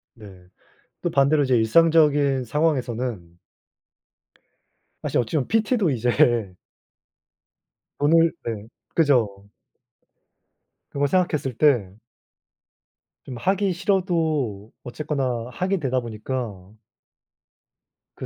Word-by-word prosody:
네, 95 Hz, -5 st, -14 dB, 0.6 s
또 175 Hz, -, -1 dB
반대로 140 Hz, 0 st, +3 dB
이제 130 Hz, -2 st, +2 dB
일상적인 145 Hz, +1 st, +3 dB
상황에서는 120 Hz, -, -2 dB, 1.6 s
사실 -, -, 0 dB
어찌 120 Hz, +6 st, -2 dB
보면 135 Hz, -, -1 dB
PT도 220 Hz, -4 st, +1 dB
이제 115 Hz, -4 st, +1 dB, 1.4 s
오늘 165 Hz, +3 st, +4 dB
네. 110 Hz, -2 st, -5 dB, 0.3 s
그죠. 115 Hz, -11 st, +1 dB, 1.4 s
그걸 140 Hz, 0 st, 0 dB
생각했을 150 Hz, -6 st, 0 dB
때. 120 Hz, -11 st, +2 dB, 1.3 s
좀 125 Hz, -3 st, -8 dB
하기 190 Hz, -, 0 dB
싫어도 160 Hz, -, -1 dB
어쨌거나 125 Hz, -2 st, -3 dB
하게 190 Hz, +9 st, -1 dB
되다 130 Hz, -3 st, 0 dB
보니까. 110 Hz, -4 st, -6 dB, 1.4 s
그 -, -, -7 dB
130 Hz, 185 characters per minute, -23 LUFS, 115-160 Hz, 1.6 s, 오늘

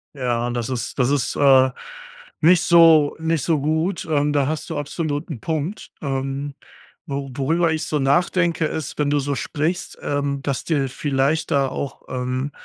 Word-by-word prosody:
Ja, 120 Hz, -3 st, -1 dB
das 120 Hz, -1 st, -3 dB
ist 125 Hz, -3 st, -4 dB
das 125 Hz, -2 st, +2 dB
ist, 140 Hz, -2 st, 0 dB
äh, 130 Hz, -2 st, +5 dB, 0.7 s
nicht 170 Hz, +2 st, +5 dB
so 165 Hz, -4 st, +6 dB
nicht 160 Hz, -3 st, 0 dB
so 160 Hz, -3 st, +1 dB
gut, 160 Hz, +5 st, -1 dB
ähm, 145 Hz, -1 st, +2 dB
da 140 Hz, -2 st, +2 dB
hast 155 Hz, +2 st, -3 dB
du 160 Hz, -, -3 dB
absolut 145 Hz, +1 st, -3 dB
'n 135 Hz, -9 st, -6 dB
Punkt. 160 Hz, +5 st, -3 dB
Ähm, 135 Hz, 0 st, -3 dB, 0.5 s
wo 140 Hz, -1 st, -4 dB
worüber 160 Hz, +5 st, +1 dB
ich 155 Hz, -1 st, -2 dB
so 150 Hz, -1 st, -1 dB
nachdenke, 170 Hz, +4 st, +2 dB
ist, 155 Hz, -2 st, -4 dB
wenn 145 Hz, -1 st, +2 dB
du 145 Hz, 0 st, +2 dB
so 140 Hz, 0 st, -2 dB
sprichst, 160 Hz, +7 st, -3 dB
ähm, 140 Hz, -1 st, -2 dB
dass 140 Hz, -3 st, -2 dB
dir 145 Hz, -5 st, +1 dB
vielleicht 140 Hz, +3 st, 0 dB
da 140 Hz, -1 st, +3 dB
auch, 135 Hz, +1 st, -5 dB
ähm 130 Hz, +2 st, -2 dB
145 Hz, 170 wpm, -22 LUFS, 135-160 Hz, 0.7 s, so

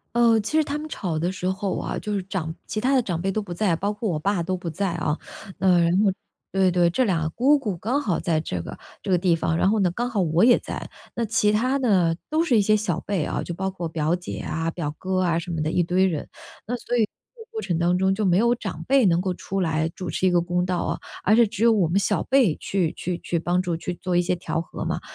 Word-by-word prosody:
呃， 235 Hz, -1 st, +5 dB
其 265 Hz, +9 st, -1 dB
实 315 Hz, -, +4 dB
她 290 Hz, 0 st, -3 dB
们 305 Hz, +1 st, -6 dB
吵 180 Hz, -, -3 dB
的 170 Hz, +3 st, 0 dB
时 185 Hz, -1 st, -2 dB
候 190 Hz, 0 st, -2 dB
啊， -, -, -3 dB
就 210 Hz, -, -4 dB
是 200 Hz, -, 0 dB
长 180 Hz, -4 st, -4 dB
其 215 Hz, -, -3 dB
他 260 Hz, +4 st, +2 dB
的 260 Hz, -, +4 dB
长 175 Hz, -7 st, -3 dB
辈 195 Hz, +2 st, 0 dB
都 215 Hz, -, -1 dB
不 190 Hz, -4 st, -7 dB
在， 175 Hz, -1 st, +1 dB
包 200 Hz, +4 st, -1 dB
括 215 Hz, +1 st, -3 dB
我 160 Hz, -4 st, -1 dB
爸 190 Hz, +1 st, 0 dB
都 185 Hz, +2 st, -2 dB
不 175 Hz, -1 st, -5 dB
在 190 Hz, +3 st, -1 dB
啊， 150 Hz, -2 st, -1 dB, 0.4 s
那 185 Hz, -2 st, +4 dB
然 170 Hz, 0 st, +3 dB
后 200 Hz, -, +4 dB, 0.4 s
对 190 Hz, -1 st, +3 dB
对， 175 Hz, -1 st, +3 dB
这 255 Hz, +9 st, +1 dB
俩 165 Hz, -6 st, 0 dB
姑 265 Hz, -, +3 dB
姑 210 Hz, -10 st, -3 dB
刚 245 Hz, -, -1 dB
好 185 Hz, -, 0 dB
在 165 Hz, -4 st, 0 dB
这 90 Hz, -, -4 dB
个 -, -, -8 dB, 0.2 s
这 -, -, -6 dB
个 185 Hz, -, +4 dB
地 175 Hz, -1 st, +2 dB
方， 165 Hz, -, 0 dB
然 185 Hz, -, +3 dB
后 215 Hz, +1 st, +2 dB
呢， 190 Hz, -3 st, +3 dB
刚 240 Hz, +7 st, -2 dB
好 225 Hz, -4 st, -1 dB
我 170 Hz, +2 st, +2 dB
也 245 Hz, +1 st, +6 dB
在。 -, -, -6 dB, 0.3 s
那 235 Hz, -, -1 dB
其 210 Hz, -1 st, +2 dB
他 255 Hz, +6 st, +2 dB
呢， 190 Hz, -10 st, +3 dB, 0.2 s
都 315 Hz, +2 st, +2 dB
是 255 Hz, -9 st, +3 dB
一 -, -, +5 dB
些 215 Hz, +2 st, +3 dB
小 205 Hz, -6 st, -1 dB
辈 195 Hz, -6 st, -1 dB
啊， -, -, -2 dB
就 175 Hz, -, -5 dB
包 190 Hz, +2 st, -2 dB
括 175 Hz, -3 st, -4 dB
表 160 Hz, 0 st, 0 dB
姐 180 Hz, 0 st, -6 dB
啊、 165 Hz, +1 st, -2 dB
表 150 Hz, -4 st, -4 dB
哥 185 Hz, 0 st, 0 dB
啊 170 Hz, -2 st, +1 dB
什 170 Hz, -, -8 dB
么 165 Hz, -2 st, -2 dB
的 155 Hz, +1 st, -1 dB
一 180 Hz, -, +2 dB
堆 180 Hz, +2 st, +2 dB
人， 165 Hz, -6 st, -2 dB, 0.4 s
那 245 Hz, -, -1 dB
所 245 Hz, 0 st, -2 dB
以 230 Hz, -, +4 dB
这 470 Hz, -, -21 dB
个 -, -, -59 dB
过 445 Hz, -1 st, -4 dB
程 170 Hz, -2 st, -1 dB
当 175 Hz, +1 st, +2 dB
中 190 Hz, +1 st, +2 dB
就 210 Hz, +2 st, -1 dB
没 180 Hz, -1 st, +4 dB
有 235 Hz, +3 st, +4 dB
长 240 Hz, -, -5 dB
辈 270 Hz, -2 st, +4 dB
能 175 Hz, -2 st, +3 dB
够 185 Hz, -1 st, -1 dB
出 195 Hz, +2 st, -3 dB
来 160 Hz, -2 st, +1 dB
主 185 Hz, -, -5 dB
持 190 Hz, -, +1 dB
一 -, -, +3 dB
个 175 Hz, -1 st, +3 dB
公 175 Hz, +1 st, 0 dB
道 180 Hz, -1 st, -1 dB
啊， -, -, -2 dB, 0.2 s
而 205 Hz, -, +4 dB
是 235 Hz, -1 st, +6 dB
只 225 Hz, +1 st, -3 dB
有 235 Hz, -, +6 dB
我 200 Hz, -6 st, +3 dB
们 170 Hz, +4 st, 0 dB
小 200 Hz, -3 st, +1 dB
辈 255 Hz, -, +3 dB
去 180 Hz, -5 st, -1 dB
去 180 Hz, 0 st, -3 dB
去 170 Hz, -, -2 dB
帮 175 Hz, +2 st, +1 dB
助， 175 Hz, -3 st, -2 dB
去 180 Hz, +2 st, -4 dB
做 180 Hz, 0 st, -1 dB
一 -, -, +5 dB
些 180 Hz, +1 st, 0 dB
调 165 Hz, -2 st, -3 dB
和 165 Hz, -, -6 dB
嘛， -, -, -2 dB
185 Hz, 300 characters per minute, -24 LUFS, 170-215 Hz, 0.4 s, 也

